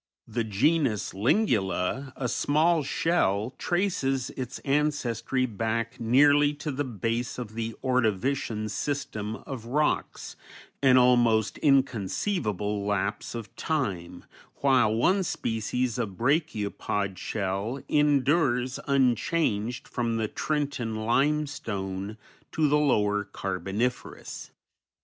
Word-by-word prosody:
The 115 +1 -1
genus 115 +1 +1
Lingula, 115 - +1
a 130 - -2
small 155 +6 +2
shell, 130 - 0
traces 140 -9 0
its 130 0 -5
ancestry 135 -3 0
back 115 +1 -2
nearly 145 +5 +4
to 150 +1 -4
the 145 +2 -2
base 115 0 -2
of 120 -4 -6
the 115 0 -4
Ordovician 120 -2 0
system 110 -5 -3
of 120 -4 -7
rocks, 150 +5 -1 0.5
an 130 -2 +6
almost 120 -4 +4
inconceivable 110 - 0
lapse 100 +2 -2
of 115 -3 -7
time, 100 - -3 0.4
while 130 -6 +4
one 185 - +3
species 125 - -2
of 100 -6 -3
brachiopod 105 - -1
shell 100 +7 -2
endures 140 -3 +2
unchanged 125 -3 +1
from 115 -2 -1
the 110 -1 0
Trenton 140 -5 -2
Limestone 110 -6 -1 0.3
to 155 -1 +2
the 150 +1 +3
Lower 105 -8 +2
Carboniferous. 100 +4 -4
120 Hz, 100 wpm, -27 LUFS, 105-140 Hz, 0.5 s, an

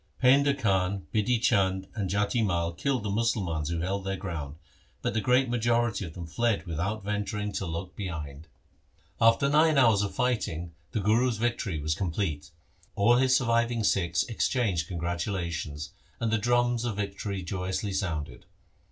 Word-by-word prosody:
Painda 140 +2 +4
Khan, 95 - 0
Bidhi 115 +3 +2
Chand, 95 -5 +2
and 100 -5 -2
Jati 105 +4 +1
Mai 85 -4 0
killed 130 +4 -1
the 105 - -2
Musalmans 95 -9 0
who 85 -1 -2
held 95 +3 -2
their 95 0 -2
ground, 80 -7 -5 0.5
but - - 0
the 110 - 0
great 125 +5 +3
majority 120 -3 +1
of 80 - -9
them 85 -2 -6
fled 100 +1 0
without 95 +6 -3
venturing 105 0 -2
to 95 - -3
look 85 +3 -4
LIFE - - -30
OF - - -33
GURU 100 -3 -3
HAR 85 - -4
GOBIND 80 -2 -4
behind. 70 +3 -12 0.9
After 140 - 0
nine 155 +1 +4
hours 115 -6 +5
of 100 -2 -3
fighting 90 -10 -1 0.2
the 110 - -1
Guru's 115 +3 +2
victory 110 -7 -1
was 75 +1 0
complete. 80 -3 -2 0.5
All 120 +4 +4
his 130 0 +4
surviving 115 -2 +1
Sikhs 85 -4 +2
exchanged 110 -7 0
congratulations, 85 -3 -3 0.3
and 115 -1 0
the 110 - +2
drums 120 +1 +2
of 120 -4 -2
vic 100 -1 -4
tory 100 -3 -3
joyously 95 +2 -3
sounded. 80 -9 -3
100 Hz, 175 wpm, -28 LUFS, 85-115 Hz, 0.9 s, hours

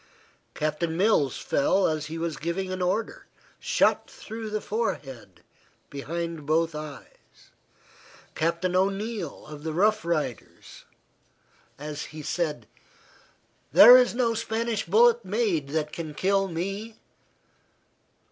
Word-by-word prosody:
Captain 155 +2 -2
Mills 180 - +2
fell 190 +7 +1
as 155 -2 -2
he 160 +2 -6
was 165 -1 -3
giving 185 +3 -3
an 185 0 -4
order, 185 +5 -2 0.3
shot - - +1
through 220 0 -8
the 215 0 -2
forehead 135 - -4 0.5
behind 165 +2 -5
both 165 +1 +1
eyes; 150 -2 -11 0.8
Captain 170 +3 -1
O'Neill, 195 -2 -2
of 150 -1 -10
the 160 -1 -3
Rough 210 +6 +2
Riders, 155 -8 -4 0.9
as 150 0 -6
he 155 0 -9
said, 155 0 -2 1.1
"There 245 - +10
is 250 -1 +4
no 240 -2 +1
Spanish 225 -1 -2
bullet 235 +5 +5
made 195 -7 0
that 150 0 -2
can 155 -3 -6
kill 195 +2 +1
me." 195 +6 -4
170 Hz, 115 wpm, -26 LUFS, 155-210 Hz, 1.1 s, There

